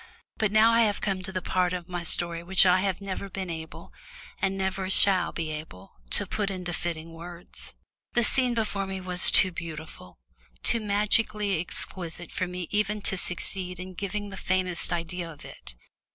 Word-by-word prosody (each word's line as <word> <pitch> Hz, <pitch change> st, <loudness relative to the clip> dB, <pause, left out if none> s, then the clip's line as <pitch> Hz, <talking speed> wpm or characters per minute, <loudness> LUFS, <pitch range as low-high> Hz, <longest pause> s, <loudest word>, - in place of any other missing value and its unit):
But 215 Hz, -2 st, +1 dB
now 215 Hz, +2 st, +5 dB
I 230 Hz, 0 st, +4 dB
have 210 Hz, -3 st, +2 dB
come 195 Hz, -2 st, -2 dB
to 190 Hz, 0 st, -4 dB
a -, -, -2 dB
part 180 Hz, -1 st, +1 dB
of 180 Hz, -1 st, -5 dB
my 175 Hz, -1 st, -4 dB
story 170 Hz, 0 st, +3 dB
which 190 Hz, +2 st, +4 dB
I 180 Hz, 0 st, +5 dB
have 195 Hz, 0 st, -1 dB
never 195 Hz, 0 st, -5 dB
been 190 Hz, -2 st, -5 dB
able, 160 Hz, -1 st, -9 dB, 0.5 s
and 195 Hz, 0 st, 0 dB
never 190 Hz, 0 st, -2 dB
shall 185 Hz, -3 st, +4 dB
be 160 Hz, -2 st, -4 dB
able, 150 Hz, -12 st, -9 dB, 0.2 s
to -, -, +3 dB
put 210 Hz, -2 st, -2 dB
into 180 Hz, -2 st, -4 dB
fitting 165 Hz, -1 st, -4 dB
words. 170 Hz, +1 st, -9 dB, 0.4 s
The 240 Hz, -, +3 dB
scene 250 Hz, +1 st, +3 dB
before 205 Hz, -3 st, -1 dB
me 190 Hz, 0 st, -4 dB
was 180 Hz, -1 st, +6 dB
too 185 Hz, -, +7 dB
beautiful, 160 Hz, -, -9 dB, 0.5 s
too 230 Hz, -, +4 dB
magically 210 Hz, -2 st, +1 dB
exquisite 175 Hz, -1 st, -5 dB
for 185 Hz, -, -2 dB
me 180 Hz, -1 st, -5 dB
even 210 Hz, 0 st, 0 dB
to -, -, 0 dB
succeed 180 Hz, 0 st, 0 dB
in 185 Hz, 0 st, -7 dB
giving 205 Hz, +2 st, -4 dB
the 190 Hz, -, -8 dB
faintest 185 Hz, -2 st, -1 dB
idea 170 Hz, 0 st, -3 dB
of 150 Hz, -, -13 dB
it. -, -, -9 dB
185 Hz, 180 wpm, -27 LUFS, 175-200 Hz, 0.5 s, too